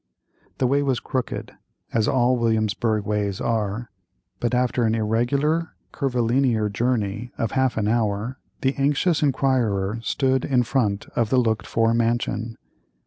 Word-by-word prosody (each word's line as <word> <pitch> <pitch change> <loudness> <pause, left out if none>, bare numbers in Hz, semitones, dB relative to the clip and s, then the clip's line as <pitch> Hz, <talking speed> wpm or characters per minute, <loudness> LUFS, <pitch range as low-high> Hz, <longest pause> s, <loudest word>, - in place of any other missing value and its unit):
The 130 - +1
way 140 +3 +2
was 135 -4 0
crooked, 130 -2 -4 0.4
as 110 -1 +2
all 130 -1 +3
Williamsburgh 110 -2 0
ways 105 -2 -1
are, 110 0 -2 0.5
but 120 +1 0
after 125 0 +1
an 110 0 +2
irregular, 140 +9 0 0.2
curvilinear 125 -4 +1
journey 110 0 -1
of 115 - -1
half 130 -2 +1
an 105 -2 0
hour, 110 +2 0 0.2
the 135 +1 +2
anxious 150 +5 +2
inquirer 120 -7 +1
stood 130 +1 +1
in 125 -3 +2
front 110 -5 0
of 115 -3 +1
the 130 - +2
looked 115 -3 +1
for 115 0 +2
mansion. 115 -1 -1
120 Hz, 140 wpm, -23 LUFS, 110-130 Hz, 0.5 s, all